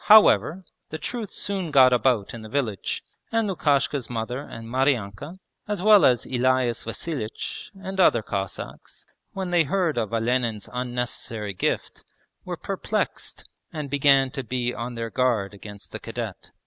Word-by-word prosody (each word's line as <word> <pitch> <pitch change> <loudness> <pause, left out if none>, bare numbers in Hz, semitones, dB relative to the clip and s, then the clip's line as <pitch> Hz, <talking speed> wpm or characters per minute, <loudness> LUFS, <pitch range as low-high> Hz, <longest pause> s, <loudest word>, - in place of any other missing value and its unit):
However, 190 -4 +6 0.2
the 155 - -4
truth 215 +6 -4
soon 190 -4 -2
got 130 -3 +7
about 120 -4 +2
in 115 - -7
the 110 - -9
village, 115 -7 -1 0.3
and 225 -1 +2
Lukashka's 140 -7 +1
mother 120 +2 -3
and 115 -5 -8
Maryanka, 130 - 0 0.3
as 205 -3 -2
well 210 -1 +8
as 125 -3 +4
Elias 130 -2 +1
Vasilich 115 -1 -4
and 190 0 -5
other 120 - +5
Cossacks, 100 -2 -6 0.3
when 190 -2 -3
they 175 -2 +4
heard 165 -4 +1
of 110 -2 -2
Olenin's 115 -2 0
unnecessary 120 -4 -3
gift, 90 - -2 0.4
were - - -5
perplexed, - - -3 0.2
and 150 -3 -5
began 140 -2 +4
to 135 - -4
be 125 -1 -1
on 120 +2 -5
their 115 -1 -4
guard 115 -6 +1
against 100 0 -10
the - - -5
cadet. - - -6
130 Hz, 150 wpm, -25 LUFS, 115-155 Hz, 0.4 s, well